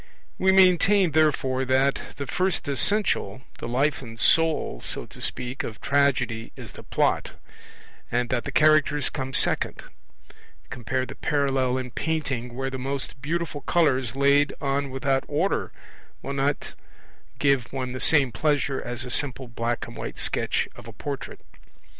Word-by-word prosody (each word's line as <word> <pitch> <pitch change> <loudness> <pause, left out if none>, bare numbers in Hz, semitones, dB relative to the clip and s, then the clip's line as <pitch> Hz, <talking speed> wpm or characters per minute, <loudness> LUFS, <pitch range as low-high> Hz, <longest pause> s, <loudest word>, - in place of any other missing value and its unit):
We 190 0 +4
maintain, 190 0 +5
therefore, 135 -4 +2
that 130 +1 +2
the 140 - -5
first 185 +3 0
essential, 140 - +1 0.2
the - - -5
life 135 +5 0
and 115 -3 -10
soul, 160 - +2
so - - -3
to - - -14
speak, 125 +2 -2
of 110 - -6
Tragedy 130 -5 +1
is - - -10
the - - -11
Plot; - - 0 0.8
and 120 0 0
that 125 -2 -1
the - - -4
Characters 155 -1 +3
come 130 -2 -4
second - - +2 0.9
compare 130 +2 -2
the - - -8
parallel 135 -3 0
in 130 -1 -5
painting, 135 -6 -3
where 135 +1 -3
the 130 - -5
most 135 0 -3
beautiful 165 0 -3
colours 135 -8 +1
laid 140 +1 +3
on 140 0 -1
without 135 0 0
order 165 +7 -1 0.5
will 140 - -4
not 140 +1 -1 0.6
give 135 -5 +1
one 130 -2 -3
the 130 - -5
same 140 -4 +4
pleasure 145 0 0
as 120 +1 -5
a 125 - -5
simple 130 -2 0
black 115 -1 -3
and 115 - -11
white - - -6
sketch - - +1
of - - -12
a - - -9
portrait. - - -6
135 Hz, 155 wpm, -25 LUFS, 125-150 Hz, 0.9 s, maintain